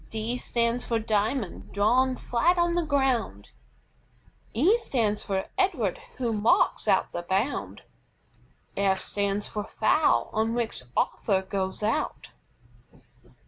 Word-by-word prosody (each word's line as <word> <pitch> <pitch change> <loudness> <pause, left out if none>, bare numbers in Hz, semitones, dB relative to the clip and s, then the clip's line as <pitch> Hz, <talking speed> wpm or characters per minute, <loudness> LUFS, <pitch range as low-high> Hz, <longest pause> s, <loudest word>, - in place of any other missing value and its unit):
D 225 +2 -2
stands 235 -1 -1
for 230 - 0
DIAMOND 220 0 -1
drawn 250 +6 +3
flat 335 +10 +1
on 345 0 +2
the 345 - +1
ground. 265 - 0 1.0
E 325 - +4
stands 225 - 0
for 190 -1 -2
EDWARD, 275 - +1 0.2
who 240 -3 -1
marks 215 +1 +2
out - - +2
the 175 - -4
bound. 195 +9 -2 0.9
F 195 -1 +2
stands 200 +1 -2
for 210 - -4
FOUL 305 +8 +2
on 225 +1 0
which 235 - -2 0.2
Arthur 190 -3 +1
goes 190 +1 -3
out. 220 +2 -2
225 Hz, 120 wpm, -27 LUFS, 200-255 Hz, 1.0 s, E